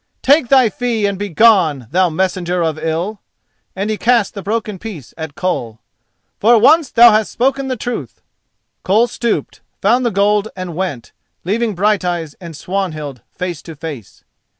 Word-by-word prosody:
Take 280 -1 +4
thy 260 -2 +5
fee 230 0 -1
and 200 -1 -2
begone, 190 - +3
thou 180 +1 +3
messenger 180 +1 -1
of 160 -1 -2
ill," 170 +7 -3 0.5
and 200 +3 -2
he 215 - -2
cast 235 -3 +2
the 200 - -6
broken 210 -1 -3
piece 185 - -9
at 160 -3 -7
Koll. 175 -11 -2 0.6
"For 235 +3 +5
once 290 +6 +5
thou 235 0 +7
hast 215 0 +1
spoken 270 +2 0
the 260 - -2
truth." 220 - -5 0.6
Koll 215 +5 +3
stooped, 235 -1 -3 0.2
found 240 +6 +2
the 240 - +2
gold 205 +1 +1
and 185 -3 -6
went, 165 -10 -4 0.3
leaving 215 +3 -1
Brighteyes 180 -5 0
and 165 -4 -9
Swanhild 155 - -4
face 175 -4 -5
to 165 - -10
face. 145 - -9
195 Hz, 155 wpm, -17 LUFS, 170-225 Hz, 0.6 s, thou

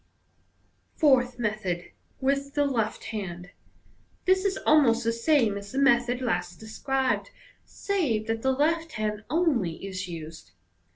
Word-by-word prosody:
Fourth 255 -5 +3
Method. 210 -6 -3 0.3
(With 275 +1 -1
the 290 -1 +3
left 225 -6 -1
hand.)— 180 -4 -6 0.7
This 375 +1 +3
is 390 -1 +1
almost 255 -6 +4
the 230 0 +1
same 230 -4 +2
as 200 0 -11
the 265 - -5
method 245 -2 +3
last 180 -7 -2
described, 260 +4 -1 0.4
save 295 - -1
that 225 0 -2
the 265 - +2
left 320 +4 0
hand 210 -1 -3
only 260 - 0
is 185 -1 -5
used. 160 -2 -9
240 Hz, 130 wpm, -27 LUFS, 205-280 Hz, 0.7 s, almost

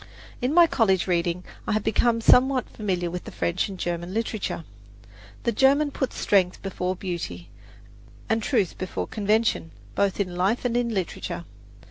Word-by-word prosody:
In 250 +2 +1
my 340 +2 +7
college 210 - +2
reading 175 0 0 0.2
I - - +1
have 215 -1 0
become 230 +2 +2
somewhat 255 +2 +5
familiar 180 -5 -2
with 180 0 -6
French 170 +4 -1
and 195 - -7
German 175 +2 -3
literature. 220 -6 -2 0.8
The 235 - +2
German 280 +5 +3
puts 265 -2 -3
strength 185 -3 +2
before 185 -1 -2
beauty, 170 - -5 0.8
and 225 0 +1
truth 215 -6 0
before 185 - -3
convention, 210 - +1 0.2
both 195 - +1
in 180 -3 -1
life 195 +8 +1
and 240 -1 0
in 240 -1 +1
literature. 185 -3 -3
200 Hz, 150 wpm, -25 LUFS, 180-230 Hz, 0.8 s, my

